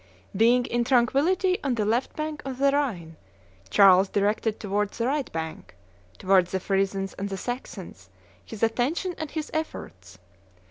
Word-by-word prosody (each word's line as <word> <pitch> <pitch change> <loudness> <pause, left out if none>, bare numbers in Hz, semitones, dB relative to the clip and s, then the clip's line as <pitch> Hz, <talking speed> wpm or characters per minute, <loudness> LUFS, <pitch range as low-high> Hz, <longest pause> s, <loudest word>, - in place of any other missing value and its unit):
Being 240 +4 +4
in 240 0 0
tranquillity 290 +10 +2
on 270 -4 0
the 215 -2 0
left 235 +5 0
bank 305 -1 -4
of 265 -2 -5
the 275 +1 +3
Rhine, 195 - -2 0.5
Charles 190 - +6
directed 210 +2 0
towards 205 0 -2
the 230 - -1
right 280 +1 -1
bank 160 - -6 0.4
towards 185 -2 +3
the 190 - +1
Frisons 195 0 -1
and 200 +1 -3
the 195 - -4
Saxons 245 +6 -7 0.3
his 220 -1 -8
attention 265 +11 0
and 315 -1 -4
his 315 0 -5
efforts. 95 - -6
225 Hz, 150 wpm, -26 LUFS, 195-275 Hz, 0.5 s, Charles